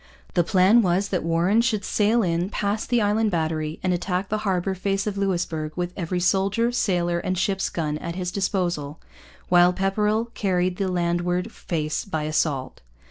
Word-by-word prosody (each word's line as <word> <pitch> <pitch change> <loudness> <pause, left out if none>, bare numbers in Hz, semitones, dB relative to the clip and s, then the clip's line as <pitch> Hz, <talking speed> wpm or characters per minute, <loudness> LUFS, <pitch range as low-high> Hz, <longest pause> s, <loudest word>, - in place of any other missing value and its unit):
The 175 - +3
plan 190 +6 +5
was 190 0 +1
that 185 - 0
Warren 170 +7 +2
should 220 -4 0
sail 220 +2 +2
in, 175 +1 0
past 205 +1 -2
the 240 -3 +2
Island 210 +2 +2
Battery, 160 -3 -2
and 185 -1 +2
attack 180 +2 -2
the 215 - -1
harbour 190 -2 0
face 195 +1 -1
of 210 -2 -2
Louisbourg 170 -6 -2
with 180 0 -3
every 180 0 -2
soldier, 195 +6 +1
sailor, 175 -7 0
and 185 +1 -2
ship's 195 +2 0
gun 150 -2 -2
at 170 0 -5
his 180 -1 -3
disposal; 175 -7 -2 0.5
while 175 0 +5
Pepperrell 210 +4 0
carried 180 -2 0
the 195 - -1
landward 175 +2 -1
face 155 -7 -3
by 160 -6 -3
assault. 150 -3 -1
185 Hz, 170 wpm, -24 LUFS, 170-200 Hz, 0.5 s, plan